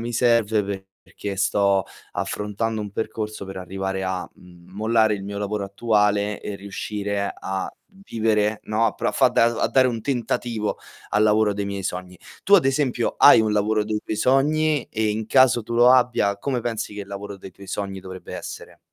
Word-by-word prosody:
mi 120 Hz, +1 st, -4 dB
serve 105 Hz, -5 st, +1 dB, 0.2 s
perché 100 Hz, -1 st, -6 dB
sto 100 Hz, -1 st, +2 dB, 0.3 s
affrontando 105 Hz, +2 st, -2 dB
un 105 Hz, -1 st, -5 dB
percorso 105 Hz, -1 st, -4 dB
per 95 Hz, 0 st, -7 dB
arrivare 95 Hz, +1 st, -4 dB
a, 95 Hz, -1 st, -2 dB
mhmm, 90 Hz, 0 st, -18 dB
mollare 110 Hz, +1 st, +2 dB
il 100 Hz, -, -6 dB
mio 100 Hz, +1 st, -6 dB
lavoro 100 Hz, 0 st, -2 dB
attuale 105 Hz, 0 st, +1 dB
e 105 Hz, -, -5 dB
riuscire 100 Hz, 0 st, -3 dB
a 95 Hz, 0 st, -3 dB, 0.4 s
vivere, 110 Hz, -1 st, +1 dB
no, 110 Hz, +2 st, +1 dB
a 105 Hz, -, 0 dB
pro -, -, -1 dB
a -, -, -2 dB
fa -, -, +4 dB
da 115 Hz, -, +3 dB
uhm, 120 Hz, -, -4 dB
a -, -, +1 dB
dare 130 Hz, -1 st, +4 dB
un 115 Hz, -2 st, -2 dB
tentativo 120 Hz, -3 st, -2 dB, 0.3 s
al 105 Hz, +1 st, +3 dB
lavoro 105 Hz, -1 st, +3 dB
dei 100 Hz, 0 st, -3 dB
miei 100 Hz, -1 st, -4 dB
sogni. 90 Hz, -1 st, -5 dB, 0.2 s
Tu 200 Hz, -, +5 dB
ad 180 Hz, -, +6 dB
esempio 135 Hz, -3 st, 0 dB
hai -, -, +8 dB
un 110 Hz, -1 st, 0 dB
lavoro 105 Hz, +1 st, +1 dB
dei 105 Hz, 0 st, -2 dB
tuoi 110 Hz, -, -4 dB
sogni? 150 Hz, +3 st, +2 dB
E, 110 Hz, 0 st, 0 dB
in 110 Hz, +1 st, -3 dB
caso 125 Hz, -2 st, +4 dB
tu 115 Hz, +2 st, -5 dB
lo 120 Hz, +1 st, +6 dB
abbia, 120 Hz, -6 st, +2 dB
come 130 Hz, +1 st, -2 dB
pensi 115 Hz, -3 st, -4 dB
che 105 Hz, -, -5 dB
il -, -, -12 dB
lavoro 100 Hz, 0 st, -7 dB
dei 95 Hz, -, -11 dB
tuoi 100 Hz, +2 st, -14 dB
sogni 95 Hz, -1 st, -4 dB
dovrebbe 95 Hz, 0 st, -9 dB
essere? -, -, -8 dB
105 Hz, 195 wpm, -23 LUFS, 100-115 Hz, 0.4 s, hai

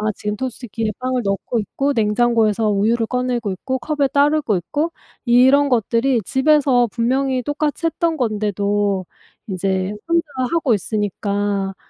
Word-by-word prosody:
지금 210 Hz, 0 st, -3 dB
토스트기에 225 Hz, -2 st, -4 dB
빵을 255 Hz, 0 st, -1 dB
넣고 200 Hz, +4 st, -1 dB
있고 275 Hz, +7 st, -1 dB
냉장고에서 225 Hz, -1 st, +2 dB
우유를 225 Hz, +3 st, +1 dB
꺼내고 245 Hz, -3 st, -2 dB
있고 260 Hz, +8 st, -3 dB
컵에 290 Hz, 0 st, 0 dB
따르고 285 Hz, -5 st, +2 dB
있고 295 Hz, -, -2 dB, 0.3 s
이런 265 Hz, +4 st, +5 dB
것들이 240 Hz, +1 st, +1 dB
집에서 265 Hz, -2 st, +3 dB
분명히 255 Hz, +3 st, 0 dB
똑같이 295 Hz, +4 st, -2 dB
했던 330 Hz, 0 st, 0 dB
건데도 205 Hz, -4 st, 0 dB, 0.4 s
이제 190 Hz, 0 st, -1 dB
혼자 335 Hz, 0 st, +2 dB, 0.3 s
하고 320 Hz, -7 st, +2 dB
있으니까 205 Hz, -1 st, -2 dB
235 Hz, 315 characters per minute, -20 LUFS, 205-270 Hz, 0.4 s, 이런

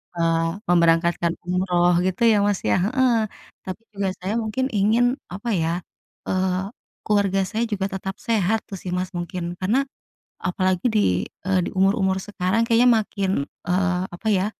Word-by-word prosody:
eee, 165 Hz, +3 st, 0 dB
memberangkatkan 170 Hz, 0 st, +3 dB
umroh 180 Hz, -1 st, +2 dB
gitu 185 Hz, +3 st, -2 dB
ya, 215 Hz, -, +5 dB
Mas, 205 Hz, -2 st, +1 dB
ya, 105 Hz, -, +2 dB
heeh. 255 Hz, +2 st, +2 dB, 0.5 s
Tapi 190 Hz, +4 st, -6 dB
juga 200 Hz, -1 st, -1 dB
saya 195 Hz, +3 st, -2 dB
mungkin 230 Hz, +3 st, -1 dB
ingin 220 Hz, +2 st, +3 dB, 0.3 s
apa 205 Hz, +5 st, -5 dB
ya, 170 Hz, +2 st, -1 dB, 0.5 s
eee, 185 Hz, +1 st, 0 dB, 0.4 s
keluarga 200 Hz, -2 st, +2 dB
saya 220 Hz, +4 st, -1 dB
juga 195 Hz, -1 st, -1 dB
tetap 190 Hz, 0 st, -5 dB
sehat 220 Hz, -1 st, +1 dB
tuh 195 Hz, -, -6 dB
sih, 180 Hz, -, -6 dB
Mas, 180 Hz, 0 st, -1 dB
mungkin. 175 Hz, 0 st, -4 dB
Karena 200 Hz, +7 st, +1 dB, 0.6 s
apalagi 185 Hz, +1 st, 0 dB
di, 95 Hz, -, +2 dB, 0.2 s
eee, 190 Hz, -1 st, +3 dB
di -, -, -4 dB
umur-umur 190 Hz, 0 st, +2 dB
sekarang 195 Hz, +2 st, -1 dB
kayaknya 235 Hz, +2 st, +5 dB
makin, 200 Hz, -2 st, -2 dB, 0.3 s
eee, 180 Hz, 0 st, +1 dB
apa 175 Hz, +5 st, -7 dB
ya, 195 Hz, -2 st, +2 dB
190 Hz, 150 wpm, -23 LUFS, 180-205 Hz, 0.6 s, ya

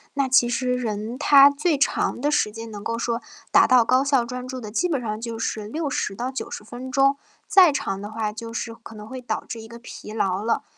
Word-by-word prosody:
那 275 Hz, -1 st, +1 dB
其 245 Hz, -2 st, +4 dB
实 250 Hz, +1 st, 0 dB
人 225 Hz, 0 st, -3 dB
他 280 Hz, 0 st, +7 dB
最 300 Hz, +2 st, 0 dB
长 275 Hz, -, 0 dB
的 290 Hz, -, 0 dB
时 215 Hz, -8 st, +1 dB
间 225 Hz, +1 st, -8 dB
能 205 Hz, -1 st, -8 dB
够 230 Hz, 0 st, -2 dB
说 235 Hz, 0 st, -1 dB, 0.3 s
达 -, -, +7 dB
到 250 Hz, -3 st, +5 dB
高 255 Hz, +3 st, +3 dB
效 275 Hz, -4 st, +2 dB
专 250 Hz, +1 st, -6 dB
注 260 Hz, 0 st, -5 dB
的， 215 Hz, -4 st, -7 dB
基 360 Hz, +10 st, 0 dB
本 285 Hz, -5 st, 0 dB
上 215 Hz, -2 st, -4 dB
就 230 Hz, -1 st, -5 dB
是 215 Hz, -2 st, -3 dB
60 280 Hz, -7 st, -2 dB
到 245 Hz, +4 st, -3 dB
90 260 Hz, -5 st, -6 dB
分 245 Hz, +3 st, -8 dB
钟， 275 Hz, +1 st, +4 dB, 0.3 s
再 365 Hz, -5 st, +7 dB
长 195 Hz, -8 st, -3 dB
的 205 Hz, -, -7 dB
话 215 Hz, -1 st, -3 dB
就 230 Hz, +1 st, -7 dB
是 230 Hz, 0 st, -4 dB
可 225 Hz, 0 st, -13 dB
能 210 Hz, 0 st, -10 dB
会 260 Hz, +2 st, -7 dB
导 220 Hz, -3 st, -3 dB
致 225 Hz, -, -7 dB
一 220 Hz, -, -12 dB
个 235 Hz, -, -10 dB
疲 230 Hz, -2 st, -10 dB
劳 195 Hz, -2 st, -1 dB
了。 230 Hz, +1 st, 0 dB
235 Hz, 245 characters per minute, -23 LUFS, 220-265 Hz, 0.3 s, 他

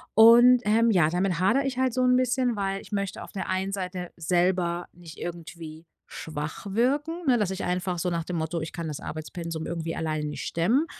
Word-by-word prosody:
Und, 240 Hz, +3 st, +8 dB
ähm, 225 Hz, +2 st, +4 dB
ja, 170 Hz, -5 st, +4 dB
damit 180 Hz, 0 st, 0 dB
hadere 235 Hz, +9 st, +3 dB
ich 270 Hz, -2 st, -2 dB
halt 260 Hz, -2 st, +1 dB
so 255 Hz, +1 st, +1 dB
'n 250 Hz, 0 st, +4 dB
bisschen, 255 Hz, -1 st, +1 dB
weil 195 Hz, 0 st, -2 dB
ich -, -, -15 dB
möchte 200 Hz, -2 st, -3 dB
auf -, -, -11 dB
der 190 Hz, -, -4 dB
einen 190 Hz, +1 st, -1 dB
Seite 180 Hz, -2 st, -4 dB
selber 175 Hz, +1 st, +1 dB
nicht 170 Hz, -2 st, -13 dB
irgendwie 165 Hz, -1 st, -8 dB, 0.2 s
schwach 155 Hz, +4 st, -6 dB
wirken, 290 Hz, -, 0 dB
ne, 250 Hz, -, +5 dB
dass 205 Hz, -3 st, +1 dB
ich 190 Hz, -, -4 dB
einfach 180 Hz, 0 st, -1 dB
so 180 Hz, -, 0 dB
nach 170 Hz, -1 st, -1 dB
dem 180 Hz, -, -4 dB
Motto: 160 Hz, +1 st, -2 dB
„Ich 160 Hz, -, -5 dB
kann 170 Hz, -2 st, -4 dB
das 150 Hz, -, -5 dB
Arbeitspensum 160 Hz, +1 st, -6 dB
irgendwie 165 Hz, -1 st, -4 dB
alleine 155 Hz, -2 st, -2 dB
nicht 150 Hz, -1 st, -5 dB
stemmen.“ 225 Hz, -, +1 dB
180 Hz, 205 wpm, -26 LUFS, 165-230 Hz, 0.2 s, Und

